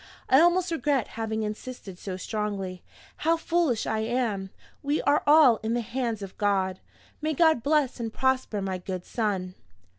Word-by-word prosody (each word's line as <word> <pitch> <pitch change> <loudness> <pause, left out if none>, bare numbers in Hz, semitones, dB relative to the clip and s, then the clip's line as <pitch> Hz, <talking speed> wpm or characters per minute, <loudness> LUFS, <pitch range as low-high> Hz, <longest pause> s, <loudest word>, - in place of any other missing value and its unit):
I 265 - +7
almost 350 +1 +3
regret 290 -6 0
having 220 -1 -3
insisted 210 -3 -7
so 185 -2 -5
strongly 195 -3 -4 0.4
how 330 +1 +2
foolish 325 -8 0
I 220 - -1
am! 220 -4 -1 0.3
We 290 +1 0
are 290 +1 +3
all 290 -6 +7
in 225 +2 -2
the 240 - 0
hands 230 -2 -3
of 195 - -8
God. 190 -2 +1 0.4
May 310 0 -1
God 320 -5 +4
bless 285 -2 +1
and 225 -1 -3
prosper 260 -5 0
my 190 -1 -3
good 185 -1 -5
son! 195 -5 -2
230 Hz, 160 wpm, -27 LUFS, 200-285 Hz, 0.4 s, I